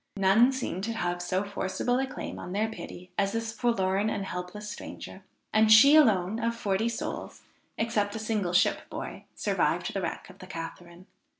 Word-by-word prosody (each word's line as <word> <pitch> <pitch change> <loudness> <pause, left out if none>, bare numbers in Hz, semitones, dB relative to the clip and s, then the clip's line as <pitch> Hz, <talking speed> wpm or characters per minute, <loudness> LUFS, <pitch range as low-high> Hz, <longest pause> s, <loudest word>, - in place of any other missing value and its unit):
None 200 +6 +5
seemed 250 -8 -3
to 230 - -2
have 175 -5 -2
so 185 +2 0
forcible 200 +5 -1
a 265 - 0
claim - - -6
on 180 - -6
their 215 +3 +1
pity 180 -4 -9
as 200 0 +1
this 225 -1 -2
forlorn 205 -4 +1
and 200 - -2
helpless 180 +3 -6
stranger; 205 -2 -8 0.3
and 220 0 +5
she 275 +7 +9
alone, 215 - +4
of 230 0 0
forty 215 +1 0
souls, 235 - -5 0.3
except 215 -2 0
a - - -2
single 215 -5 -1
ship 180 - +2
boy, - - -7
survived - - 0
the - - -2
wreck - - -4
of - - -20
the - - -10
Catharine. 170 +2 -8
205 Hz, 180 wpm, -28 LUFS, 185-230 Hz, 0.3 s, she